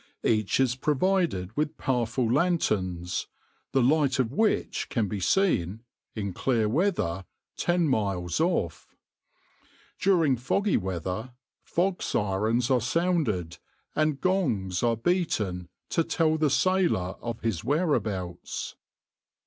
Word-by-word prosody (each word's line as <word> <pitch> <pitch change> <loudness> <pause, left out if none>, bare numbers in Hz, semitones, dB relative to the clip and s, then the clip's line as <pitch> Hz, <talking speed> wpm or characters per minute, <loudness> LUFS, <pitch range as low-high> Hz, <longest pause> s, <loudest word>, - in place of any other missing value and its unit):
Each 110 0 +1
is 130 -2 +3
provided 150 - 0
with 150 0 -1
powerful 120 -1 0
lanterns, 95 - 0 0.4
the 135 - +3
light 140 0 +3
of 125 -3 0
which 220 +6 0
can 115 -4 0
be 100 +1 -3
seen, 110 - +1 0.3
in 100 -4 -3
clear 115 +1 +1
weather, 110 - 0 0.3
ten 175 -1 +1
miles 100 - 0
off. 160 - -1 1.0
During 165 -9 +3
foggy 200 - +1
weather, 95 +6 -3 0.3
fog 180 +1 -1
sirens 110 +5 0
are 125 -2 +3
sounded 125 - 0 0.4
and 155 -2 +1
gongs 120 - 0
are 115 -1 +2
beaten 110 - -1 0.2
to 165 - +2
tell 160 -1 +1
the 155 -1 +2
sailor 170 - +2
of 115 -1 -5
his 110 -7 -1
whereabouts. 110 - -1
125 Hz, 115 wpm, -27 LUFS, -, 1.0 s, is